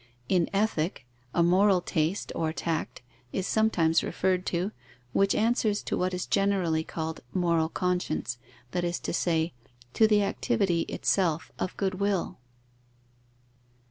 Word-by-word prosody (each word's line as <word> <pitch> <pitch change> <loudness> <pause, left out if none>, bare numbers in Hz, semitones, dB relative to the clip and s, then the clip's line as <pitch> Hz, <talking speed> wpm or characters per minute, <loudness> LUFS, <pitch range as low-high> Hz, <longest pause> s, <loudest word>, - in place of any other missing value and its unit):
In 180 -3 +2
Ethic, 195 - 0 0.3
a 170 - +2
moral 185 +2 +4
taste 170 +2 -1
or 160 -1 -1
tact 165 -6 -3 0.3
is 190 - -2
sometimes 170 -8 +3
referred 185 -1 0
to, 180 +4 -1 0.4
which 195 0 +3
answers 220 -2 +1
to - - -2
what 185 +1 0
is 180 0 -3
generally 190 -5 +1
called 160 0 -4 0.2
moral 170 -3 +2
conscience, 180 -9 -1 0.3
that 175 - -1
is 175 0 -1
to - - -4
say, 165 -1 +1 0.4
to 220 - +5
the 210 -1 +4
activity 200 -4 +1
itself 165 -5 0
of 185 - -3
good 190 -1 -1
will. 200 -7 -1
180 Hz, 135 wpm, -28 LUFS, 165-200 Hz, 0.4 s, to